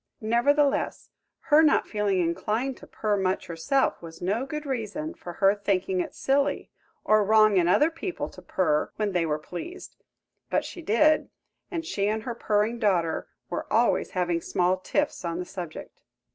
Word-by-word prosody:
Nevertheless, 275 Hz, +6 st, +1 dB, 0.3 s
her 300 Hz, +1 st, +5 dB
not 310 Hz, -, +3 dB
feeling 205 Hz, -3 st, 0 dB
inclined 215 Hz, +10 st, -1 dB
to -, -, -14 dB
purr 210 Hz, -2 st, -1 dB
much 190 Hz, 0 st, 0 dB
herself 175 Hz, -, 0 dB
was 165 Hz, -1 st, -10 dB
no 210 Hz, +9 st, -1 dB
good 300 Hz, +2 st, -5 dB
reason 275 Hz, +5 st, -3 dB
for 175 Hz, -, -9 dB
her 195 Hz, +2 st, +4 dB
thinking 195 Hz, -2 st, -1 dB
it 180 Hz, -, -3 dB
silly 280 Hz, +1 st, 0 dB, 0.3 s
or 215 Hz, 0 st, +4 dB
wrong 215 Hz, -1 st, +5 dB
in 175 Hz, -2 st, +3 dB
other 300 Hz, -, +4 dB
people 345 Hz, +2 st, -4 dB
to -, -, -13 dB
purr 155 Hz, -5 st, 0 dB
when 210 Hz, -2 st, -1 dB
they 175 Hz, -3 st, +1 dB
were 150 Hz, -1 st, 0 dB
pleased; 180 Hz, -, -8 dB, 0.5 s
but -, -, +1 dB
she 350 Hz, -, -8 dB
did, 305 Hz, +4 st, +3 dB, 0.4 s
and 335 Hz, -3 st, -4 dB
she 200 Hz, -10 st, -1 dB
and 215 Hz, +1 st, -1 dB
her 240 Hz, -, -3 dB
purring 215 Hz, +1 st, 0 dB
daughter 180 Hz, -7 st, +1 dB, 0.2 s
were -, -, -4 dB
always -, -, +2 dB
having 175 Hz, -2 st, +1 dB
small 180 Hz, +2 st, +1 dB
tiffs 285 Hz, +7 st, -1 dB
on 170 Hz, -1 st, -2 dB
the 180 Hz, -, -4 dB
subject. 175 Hz, -4 st, -8 dB
210 Hz, 170 wpm, -26 LUFS, 180-275 Hz, 0.5 s, her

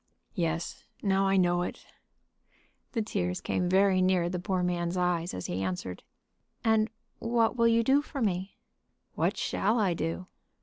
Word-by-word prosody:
"Yes; 165 Hz, -3 st, -2 dB, 0.2 s
now 195 Hz, -1 st, +3 dB
I 195 Hz, 0 st, +3 dB
know 175 Hz, -1 st, +3 dB
it." 180 Hz, -, -5 dB, 1.1 s
The 225 Hz, -3 st, 0 dB
tears 90 Hz, -, -2 dB
came 180 Hz, -1 st, -1 dB
very 190 Hz, 0 st, +4 dB
near 185 Hz, -2 st, +3 dB
the 180 Hz, 0 st, -2 dB
poor 185 Hz, 0 st, -1 dB
man's 175 Hz, 0 st, -1 dB
eyes 180 Hz, -1 st, +1 dB
as 90 Hz, -, -5 dB
he 90 Hz, +2 st, -2 dB
answered. 90 Hz, -1 st, -3 dB, 0.6 s
"And 220 Hz, -1 st, +3 dB, 0.3 s
what 230 Hz, 0 st, +2 dB
will 235 Hz, -1 st, +4 dB
you 230 Hz, 0 st, +4 dB
do 270 Hz, +4 st, +4 dB
for 290 Hz, -1 st, -7 dB
me?" 195 Hz, -4 st, -1 dB, 0.6 s
"What -, -, 0 dB
shall 220 Hz, +4 st, +1 dB
I 195 Hz, -5 st, +2 dB
do?" 165 Hz, +2 st, -3 dB
185 Hz, 160 wpm, -29 LUFS, 175-215 Hz, 1.1 s, very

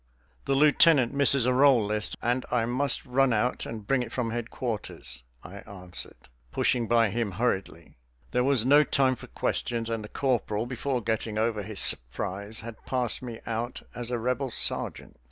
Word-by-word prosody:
"The 135 Hz, -, +1 dB
lieutenant 145 Hz, -2 st, +5 dB
misses 140 Hz, -2 st, +3 dB
a 125 Hz, -, +3 dB
roll 130 Hz, -4 st, +5 dB
list, 105 Hz, +1 st, -1 dB
and 125 Hz, +2 st, +1 dB
I 120 Hz, -2 st, +1 dB
must 130 Hz, +3 st, 0 dB
run 135 Hz, +1 st, +2 dB
out 115 Hz, +3 st, 0 dB
and 110 Hz, -3 st, -7 dB
bring 135 Hz, +4 st, +2 dB
it 120 Hz, -, -5 dB
from 120 Hz, -3 st, -2 dB
headquarters," 115 Hz, -, -5 dB, 0.2 s
I 95 Hz, -, -10 dB
answered, 95 Hz, -, -9 dB, 0.2 s
pushing 120 Hz, -2 st, +1 dB
by 115 Hz, -2 st, +3 dB
him 115 Hz, -3 st, -2 dB
hurriedly. 95 Hz, -, -2 dB, 0.3 s
There 125 Hz, -, +2 dB
was 130 Hz, -4 st, +2 dB
no 145 Hz, +3 st, +6 dB
time 130 Hz, -3 st, +2 dB
for -, -, -12 dB
questions, 115 Hz, -1 st, -2 dB
and 115 Hz, -1 st, -2 dB
the 105 Hz, -, -9 dB
corporal, 115 Hz, -5 st, -1 dB
before 130 Hz, 0 st, -2 dB
getting 110 Hz, -1 st, -2 dB
over 110 Hz, -1 st, 0 dB
his 105 Hz, 0 st, -2 dB
surprise, 100 Hz, -, -1 dB
had 115 Hz, -1 st, -10 dB
passed 125 Hz, -3 st, 0 dB
me 120 Hz, -3 st, -7 dB
out 115 Hz, +2 st, -4 dB
as 120 Hz, -1 st, -4 dB
a 125 Hz, -, -1 dB
Rebel 125 Hz, +3 st, -1 dB
sergeant. 115 Hz, -, -1 dB
120 Hz, 170 wpm, -27 LUFS, 110-130 Hz, 0.3 s, no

